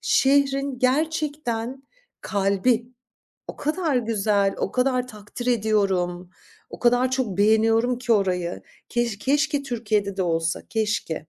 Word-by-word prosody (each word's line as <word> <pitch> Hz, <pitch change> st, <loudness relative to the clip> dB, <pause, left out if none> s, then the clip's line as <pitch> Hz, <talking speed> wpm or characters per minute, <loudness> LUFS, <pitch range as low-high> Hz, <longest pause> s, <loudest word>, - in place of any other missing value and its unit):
Şehrin 275 Hz, -1 st, +2 dB
gerçekten 270 Hz, -3 st, -1 dB, 0.4 s
kalbi. 205 Hz, +4 st, +1 dB, 0.6 s
O -, -, -8 dB
kadar 310 Hz, -1 st, -1 dB
güzel, 210 Hz, -4 st, +1 dB
o -, -, -2 dB
kadar 250 Hz, 0 st, +1 dB
takdir 215 Hz, +2 st, -9 dB
ediyorum, 195 Hz, -6 st, 0 dB, 0.4 s
o -, -, -9 dB
kadar 245 Hz, +1 st, +3 dB
çok 255 Hz, -8 st, -2 dB
beğeniyorum 225 Hz, +3 st, +3 dB
ki 245 Hz, -1 st, 0 dB
orayı. 180 Hz, -4 st, 0 dB, 0.3 s
Keş 240 Hz, -3 st, -1 dB
keşke 290 Hz, +4 st, +1 dB
Türkiye'de 215 Hz, -6 st, -1 dB
de 190 Hz, -, 0 dB
olsa, 165 Hz, -1 st, -1 dB
keşke. 210 Hz, -8 st, -2 dB
230 Hz, 115 wpm, -24 LUFS, 200-260 Hz, 0.6 s, kadar